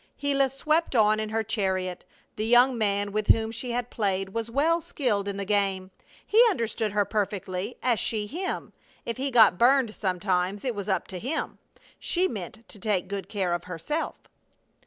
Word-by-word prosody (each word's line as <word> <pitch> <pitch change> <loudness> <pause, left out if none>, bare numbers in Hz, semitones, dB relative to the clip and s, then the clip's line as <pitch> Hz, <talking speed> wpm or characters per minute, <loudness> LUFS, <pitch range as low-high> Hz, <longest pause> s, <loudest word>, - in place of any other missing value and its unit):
Gila 275 -1 +2
swept 305 +3 0
on 215 -1 +4
in 215 0 -3
her 220 +1 0
chariot. 190 -4 -2 0.3
The 215 +1 -2
young 245 +2 +5
man 205 -2 0
with 215 0 -2
whom 225 0 +4
she 235 +2 -5
had 240 0 -2
played 195 -3 -1
was 230 +3 -3
well 315 +7 +2
skilled 245 - -1
in 200 -1 -3
the 200 - -3
game. 195 -2 0 0.3
He 445 +3 +6
understood 225 - -2
her 205 -1 +2
perfectly, 200 0 -3
as 240 -4 +2
she 215 -2 -1
him. 355 - -4 0.3
If 230 - -3
he 275 +2 -1
got 225 -8 +6
burned 250 -2 +4
sometimes 185 +1 -1
it 250 - 0
was 205 -1 -5
"up 190 -3 0
to 185 - -5
him." 270 - -3 0.4
She 365 +1 +1
meant 225 - -7
to 210 - -9
take 195 -3 0
good 195 -2 -5
care 190 -5 -1
of 175 0 -3
herself. 180 - -3
215 Hz, 180 wpm, -27 LUFS, 195-245 Hz, 0.4 s, He